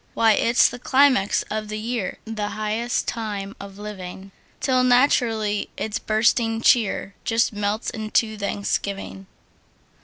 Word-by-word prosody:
Why, 225 -1 +4
it's 235 +3 +4
the 245 - -7
climax 260 -6 +3
of 215 0 -3
the 215 0 -4
year, 225 -2 -3
The 215 -2 -3
highest 215 +3 -1
time 205 -3 -4
of 200 -1 -10
living! 195 -2 -8 0.3
Till 255 -2 +2
naturally 235 -5 +2
its 220 0 -2
bursting 225 +1 +1
cheer 210 -4 +2
Just 225 -1 +1
melts 205 +1 -2
into 220 0 0
thanksgiving. 200 -1 -3
215 Hz, 125 wpm, -23 LUFS, 205-235 Hz, 0.3 s, Why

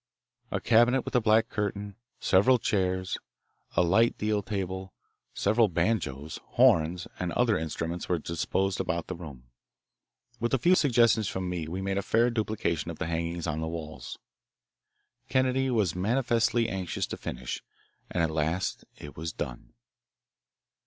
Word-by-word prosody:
A - - -1
cabinet 120 +3 +4
with - - -5
a 125 - +5
black 110 +1 +4
curtain, 105 -1 -3 0.2
several 125 +7 +4
chairs, 95 -4 0 0.6
a - - +6
light 110 +7 +3
deal 105 -1 0
table, 95 -2 -4 0.4
several 110 +3 +3
banjos, 80 - -1
horns, 85 +3 +4
and 90 -1 -2
other 120 -3 +3
instruments 80 +2 -3
were 90 - +2
disposed 95 +4 -1
about 85 -3 -1
the 90 - -5
room. 75 -7 -10 1.0
With 120 +3 +1
a - - +2
few 175 +9 +4
suggestions 115 - +4
from 95 -1 -3
me 90 -3 -3
we 90 +4 -4
made 100 0 0
a - - -1
fair 115 +4 +2
duplication 105 -8 -1
of 85 - -6
the - - -2
hangings 85 0 -2
on 80 -1 -2
the 80 - -2
walls. 80 -2 -6 1.1
Kennedy 130 0 +2
was 105 -8 +1
manifestly 115 +3 +2
anxious 95 -5 -2
to - - -5
finish, - - -5 0.5
and 85 - 0
at 80 - +1
last 80 +4 -1
it 75 - -10
was 80 +1 -4
done. - - -6
95 Hz, 150 wpm, -28 LUFS, 85-115 Hz, 1.1 s, a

